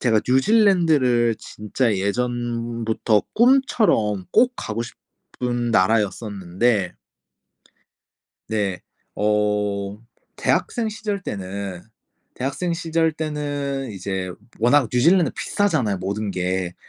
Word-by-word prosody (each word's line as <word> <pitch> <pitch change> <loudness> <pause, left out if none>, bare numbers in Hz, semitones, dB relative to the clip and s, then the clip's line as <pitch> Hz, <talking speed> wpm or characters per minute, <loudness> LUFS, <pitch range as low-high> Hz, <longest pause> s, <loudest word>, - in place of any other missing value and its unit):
제가 110 -4 +3
뉴질랜드를 140 - +3
진짜 110 +2 -2
예전부터 115 +1 -1
꿈처럼 225 - +3
꼭 250 +1 +4
가고 110 +1 -3
싶은 120 0 -5
나라였었는데 100 -1 +1 1.6
네. 100 -4 -1 0.3
어 105 -1 0 0.4
대학생 235 -3 0
시절 210 -2 -3
때는 95 - -5 0.5
대학생 140 +7 -2
시절 165 -1 0
때는 145 -3 -3
이제 95 -1 -4 0.3
워낙 125 +2 +4
뉴질랜드 165 +8 +4
비싸잖아요, 150 - 0
모든 100 +2 -3
게. 90 -1 -2
115 Hz, 210 characters per minute, -22 LUFS, 100-150 Hz, 1.6 s, 꼭